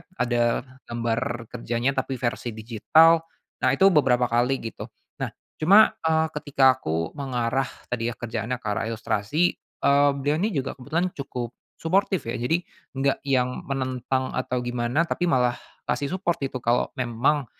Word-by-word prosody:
Ada 120 Hz, -3 st, +1 dB, 0.2 s
gambar 115 Hz, 0 st, -2 dB
kerjanya, 120 Hz, +3 st, -1 dB
tapi 135 Hz, 0 st, -2 dB
versi 120 Hz, -2 st, -3 dB
digital. 125 Hz, +9 st, +4 dB, 0.4 s
Nah, -, -, +3 dB
itu 195 Hz, +6 st, +5 dB
beberapa 125 Hz, -6 st, +3 dB
kali 125 Hz, +3 st, +1 dB
gitu. 115 Hz, -, -6 dB, 0.3 s
Nah, -, -, -1 dB, 0.3 s
cuma, 200 Hz, +7 st, +7 dB, 0.2 s
eee, 160 Hz, 0 st, +3 dB
ketika 135 Hz, -3 st, +3 dB
aku 80 Hz, -2 st, -2 dB
mengarah 130 Hz, -1 st, 0 dB, 0.2 s
tadi 120 Hz, -2 st, -1 dB
ya, 120 Hz, -, -6 dB
kerjaannya 120 Hz, +2 st, -3 dB
ke -, -, -5 dB
arah 105 Hz, +2 st, -1 dB
ilustrasi, 110 Hz, -, -1 dB, 0.4 s
eee, 140 Hz, +1 st, +5 dB
beliau 145 Hz, +3 st, 0 dB
ini 205 Hz, +5 st, +1 dB
juga 135 Hz, -2 st, -1 dB
kebetulan 165 Hz, +7 st, -2 dB
cukup 125 Hz, -3 st, -4 dB, 0.2 s
suportif 190 Hz, +2 st, 0 dB
ya. 125 Hz, -, -3 dB
Jadi, 165 Hz, +9 st, 0 dB, 0.3 s
gak 135 Hz, 0 st, +1 dB
yang 125 Hz, -2 st, 0 dB
menentang 130 Hz, -1 st, -1 dB
atau 125 Hz, -1 st, -2 dB
gimana, 120 Hz, +5 st, 0 dB
tapi 175 Hz, +1 st, -1 dB
malah 125 Hz, -5 st, +2 dB, 0.3 s
ngasih 145 Hz, +5 st, -1 dB
support 175 Hz, -2 st, 0 dB
itu 135 Hz, -, -4 dB
kalau 120 Hz, +1 st, +2 dB
memang, 130 Hz, +4 st, +1 dB
130 Hz, 150 wpm, -25 LUFS, 120-145 Hz, 0.4 s, cuma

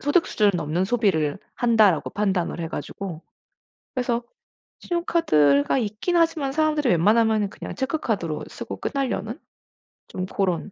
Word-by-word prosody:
소득 290 Hz, +5 st, +2 dB
수준을 210 Hz, -1 st, +2 dB
넘는 165 Hz, +3 st, -1 dB
소비를 190 Hz, -9 st, +1 dB, 0.2 s
한다.'라고 220 Hz, -8 st, +3 dB
판단을 190 Hz, -4 st, -1 dB
해가지고 170 Hz, +1 st, -6 dB, 0.7 s
그래서 245 Hz, -2 st, 0 dB, 0.6 s
신용카드가 270 Hz, -, +2 dB
있긴 220 Hz, -, -1 dB
하지만 325 Hz, -5 st, +2 dB
사람들이 305 Hz, -2 st, +1 dB
웬만하면은 215 Hz, +4 st, +3 dB
그냥 -, -, -8 dB
체크카드로 230 Hz, -, -2 dB
쓰고 -, -, -7 dB
끝내려는 275 Hz, -2 st, -2 dB, 0.7 s
좀 185 Hz, -, -4 dB
그런 185 Hz, 0 st, -1 dB
215 Hz, 330 characters per minute, -24 LUFS, 180-275 Hz, 0.7 s, 한다.'라고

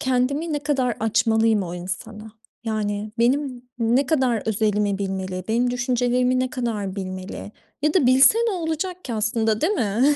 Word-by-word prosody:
kendimi 265 Hz, +5 st, 0 dB
ne 295 Hz, -, 0 dB
kadar 270 Hz, -5 st, 0 dB
açmalıyım 225 Hz, -1 st, +2 dB
o 175 Hz, -1 st, -5 dB
insana? 210 Hz, +5 st, -7 dB, 0.3 s
Yani 210 Hz, -1 st, -2 dB
benim 255 Hz, +1 st, +1 dB, 0.2 s
ne 240 Hz, +4 st, +2 dB
kadar 260 Hz, -7 st, +1 dB
özelimi 210 Hz, -2 st, +1 dB
bilmeli, 190 Hz, -2 st, -3 dB
benim 245 Hz, +2 st, +2 dB
düşüncelerimi 250 Hz, 0 st, +1 dB
ne 255 Hz, -, -1 dB
kadar 210 Hz, -6 st, -3 dB
bilmeli 185 Hz, +1 st, -6 dB, 0.3 s
ya 300 Hz, 0 st, +2 dB
da 285 Hz, -9 st, +4 dB
bilse 265 Hz, -, +6 dB
ne -, -, 0 dB
olacak 355 Hz, +1 st, -3 dB
ki 240 Hz, -, -4 dB
aslında, 220 Hz, 0 st, 0 dB
değil 345 Hz, +6 st, +2 dB
mi? 245 Hz, -, +2 dB
235 Hz, 155 wpm, -23 LUFS, 210-260 Hz, 0.3 s, bilse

